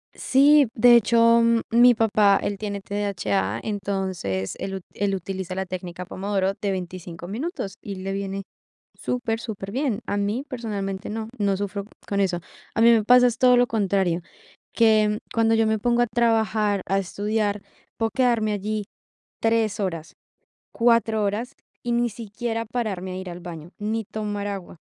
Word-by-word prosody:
Sí, 285 0 +5
de 245 +1 +7
hecho, 230 0 +5 0.3
mi 240 +2 +6
papá, 210 -3 +4
él 200 -1 -2
tiene 200 -1 -4
TDHA, 115 - -1
entonces 190 - -3
él 195 - -4
ut 190 - -5
él 200 -1 -1
utiliza 190 0 -4
la 190 +1 -2
técnica 180 -1 -6
pomodoro 195 +1 -1
de 200 0 -3
25 180 -2 -6
minutos, 225 - -4
y 200 - -6
le 190 +1 -5
viene 195 0 -3 0.5
super 230 -2 -2
superbién. 225 +2 -3
A 205 - -1
mí, 210 +6 -1
personalmente, 205 -7 -4
no. 220 +1 -4
No 200 -2 +1
sufro 200 0 -4 0.2
con 200 0 -1
eso. 180 -3 0 0.3
A 225 - +2
mí 235 - +8
me 225 -2 +3
pasa, 250 +2 +7
es 240 - 0
todo 250 -1 +6
lo 245 0 +4
contrario, 195 -6 +1 0.5
que 215 -2 +4
cuando 225 0 +3
yo 225 0 +3
me 220 0 +2
pongo 240 +3 +1
a 240 - +3
trabajar, 220 -4 +1
a 195 +1 +2
estudiar, 205 +2 -1 0.4
puedo 225 -1 0
quedarme 235 -5 +2
allí 210 +1 -3 0.6
3 225 -2 +1
horas, 165 -4 -4 0.6
4 230 -2 +3
horas, 215 +6 -2 0.3
y 240 - -1
ni 240 0 +2
siquiera 230 +1 -4
pararme 205 -6 -3
a - - -5
ir 185 -1 -6
al 175 - -8
baño, 170 -1 -9
ni 220 +2 -2
tomar 205 -1 -4
agua. 195 -4 -6
205 Hz, 160 wpm, -24 LUFS, 195-230 Hz, 0.6 s, mí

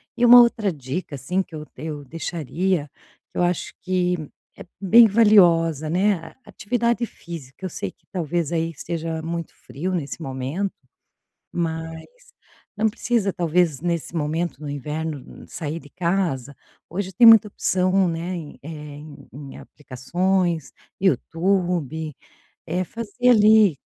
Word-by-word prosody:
E 240 - -1
uma 245 +1 +10
outra 225 -4 +3
dica, 145 +2 -5
assim, 180 +8 -1
que 165 - -9
eu 150 0 -7
eu 150 0 -6
deixaria, 165 +2 -2 0.4
que - - -10
eu - - +3
acho 175 -1 -1
que, 180 -4 -1 0.3
é - - -10 0.2
bem 225 +4 +7
valiosa, 170 -8 +4
né. 195 +4 +2
A - - -12
atividade 235 +1 -1
física, 165 0 -10
eu - - -3
sei 100 - -4
que - - -40
talvez, 170 -2 -2
aí, 165 0 0
esteja 165 +1 -4
muito 170 0 -4
frio 185 +7 -5
nesse 160 0 -4
momento, 135 +8 -3 0.8
mas, 165 -1 -3 0.7
não 220 +1 +3
precisa 220 -2 0
talvez, 170 -4 +1
nesse 170 -1 -2
momento 160 +1 -2
no 145 - -5
inverno, 150 0 -5
sair 160 0 -5
de 145 - -16
casa, 170 -7 -1 0.3
hoje 190 +2 -4
tem 230 +6 +5
muita 225 -2 +9
opção, 185 -1 +1
né, 170 +2 -3
em 155 -4 -8
eh, 150 - -9 0.3
em 150 0 -12
em 140 -1 -9
aplicações, 170 +4 -2 0.3
YouTube. 170 -5 0 0.6
Eh, 180 +2 0
fazer, 230 +4 0
ali, 210 - +6
170 Hz, 140 wpm, -23 LUFS, 155-190 Hz, 0.8 s, uma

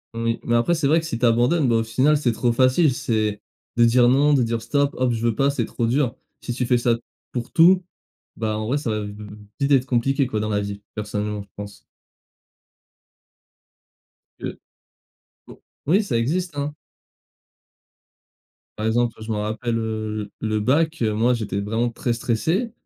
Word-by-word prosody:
Oui 115 0 -1
mais 120 - -1
après 120 +9 +2
c'est 160 -3 -1
vrai 160 +3 +4
que 160 - -5
si 115 - -3
tu 125 - +1
abandonnes, 125 +6 +3
bah, 115 - +3
au 115 - +1
final 130 +7 +2
c'est 125 -5 0
trop 120 +1 +1
facile. 130 +4 +3
C'est 110 -4 -1 0.4
de 120 - +6
dire, 120 +1 +5
non, 140 +4 +4
de 130 -4 +3
dire, 115 0 -2
stop, 140 +4 0
hop 125 -1 +1
je 115 0 -2
veux 115 -2 +1
pas 140 0 +2
c'est 130 -5 -1
trop 115 - -2
dur. 130 0 +1 0.3
Si 120 - -4
tu 125 -1 -2
fais 125 - +4
ça, 120 -1 +2 0.4
pour 120 -2 -4
tout, 180 +3 +5 0.5
bah, 110 -1 -2
en 110 0 -3
vrai 135 - +1
ça 135 -6 -2
va 105 - -1
v 105 - -5
v 105 - -8 0.3
vite 140 +1 0
être 135 -1 +4
compliqué 135 +2 +1
quoi, 110 -4 -2
dans 105 0 -2
la 105 -1 0
vie, 100 0 -6
personnellement, 105 0 -3
je 100 - -14
pense. 100 0 -9 2.6
De - - -6 0.9
bo - - -14 0.2
oui, 185 +9 +4
ça 195 - -2
existe, 155 +7 -1
hein. 145 +1 -3 2.0
Par 110 +1 -1
exemple 120 0 +1
je 110 +1 -5
m'en 105 - -1
rappelle, 115 +2 -2
heu, 110 -2 -3
l 110 - -1
le 110 0 +1
bac 155 +6 +1
moi 115 +3 +2
j'étais 100 -3 -3
vraiment 110 +4 -1
très 120 +1 -3
stressé, 160 - -1
120 Hz, 190 wpm, -22 LUFS, 110-140 Hz, 2.6 s, de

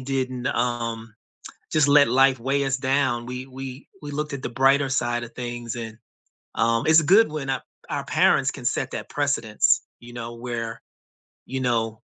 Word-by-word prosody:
didn't, 130 -1 -3
um, 115 -2 -2 0.6
just 150 -2 +3
let 145 -3 +6
life 135 +1 +4
weigh 140 +3 0
us 135 -1 0
down, 130 -3 0
we 125 +1 -6
we 135 +1 -9
we 145 - -6
looked 150 0 -3
at 135 - -6
the - - -4
brighter 135 +3 +3
side 120 -2 0
of 120 - -12
things 120 -1 -5
and, 115 -2 -6 0.6
um 115 0 +2
it's 160 0 +6
good 195 +3 +5
when 150 -3 -5
a 135 - -2 0.3
our - - -3
parents - - +3
can - - -10
set - - -1
that - - -6
precedence, - - +1 0.2
you 120 0 -12
know, 120 -1 -6
where, 115 -1 -5 0.6
you 130 +1 -4
know, 115 -3 -1
125 Hz, 175 wpm, -24 LUFS, 120-135 Hz, 0.6 s, let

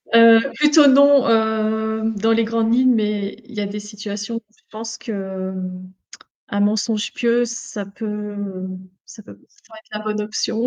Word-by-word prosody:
Heu, 230 0 +8
plutôt 295 0 +5
non, 280 0 +6
hem, 220 0 0
dans 225 +3 +2
les 225 0 +2
grandes 225 0 0
lignes, 255 0 +4
mais 210 -2 -1
il 245 - -15
y 210 - -3
a 205 - -1
des 205 +1 -5
situations 210 +1 -6
où - - -4 0.2
je - - -32
pense 225 +1 -7
que, 190 -3 -5
mmh, 185 0 -7 0.6
un 205 - -2
mensonge 210 +1 0
pieux, 240 0 +1
ça 235 -3 -6
peut, 200 +3 -8
heu, 205 -3 -5 0.4
ça 215 - -13
peut 100 - -14
p - - -27
ça - - -29
pourrait 220 -1 -14
être - - -31
la 215 - -9
bonne 215 0 -2
option. 220 +2 -2
220 Hz, 190 wpm, -20 LUFS, 205-230 Hz, 0.6 s, Heu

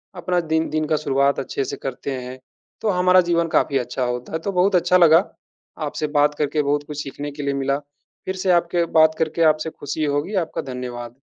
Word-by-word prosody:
अपना 180 0 0
दिन 160 0 0
दिन 155 0 -1
का 155 - +2
शुरुआत 140 -1 +1
अच्छे 135 - -3
से - - -5
करते 135 +1 -4
हैं, 130 0 -6 0.4
तो 220 - 0
हमारा 180 0 +4
जीवन 170 -1 +2
काफ़ी 140 - +1
अच्छा 125 0 -2
होता 125 +2 -4
है। 160 - -1
तो 200 +4 -3
बहुत 185 +1 +2
अच्छा 180 +1 +4
लगा, 170 +1 +6 0.6
आपसे 155 - -3
बात 145 0 +3
करके 150 0 0
बहुत 145 +1 0
कुछ 150 -1 -5
सीखने 145 +1 -6
के 145 0 -7
लिए 140 0 0
मिला, 140 0 0 0.5
फिर 190 - -3
से 185 0 0
आपके 175 0 +2
बात 160 0 +5
करके 160 +1 0
आपसे 155 +1 -5
खुशी 145 +2 -2
होगी। 145 +7 -1
आपका - - -5
धन्यवाद। 120 -1 -6
155 Hz, 210 wpm, -22 LUFS, 140-170 Hz, 0.6 s, लगा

